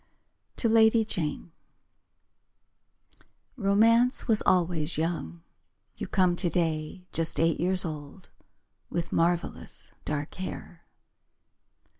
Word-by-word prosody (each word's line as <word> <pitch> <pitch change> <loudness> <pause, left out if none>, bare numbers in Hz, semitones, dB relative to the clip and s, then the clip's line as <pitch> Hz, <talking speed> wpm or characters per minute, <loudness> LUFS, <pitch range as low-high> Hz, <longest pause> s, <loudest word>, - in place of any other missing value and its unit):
To 235 - 0
Lady 225 0 +4
Jane 170 -5 -4 2.0
Romance 230 +3 +3
was 220 -3 +4
always 170 -4 +2
young. 155 - -3 0.5
You - - -6
come 180 -2 +2
today 170 -1 -2
Just 165 0 -1
eight 165 0 +2
years 185 +1 +2
old 155 +3 -8 0.6
With 170 0 -3
marvellous 170 +1 -1
dark 150 0 -3
hair. 185 -2 -8
175 Hz, 90 wpm, -27 LUFS, 160-200 Hz, 2.0 s, Lady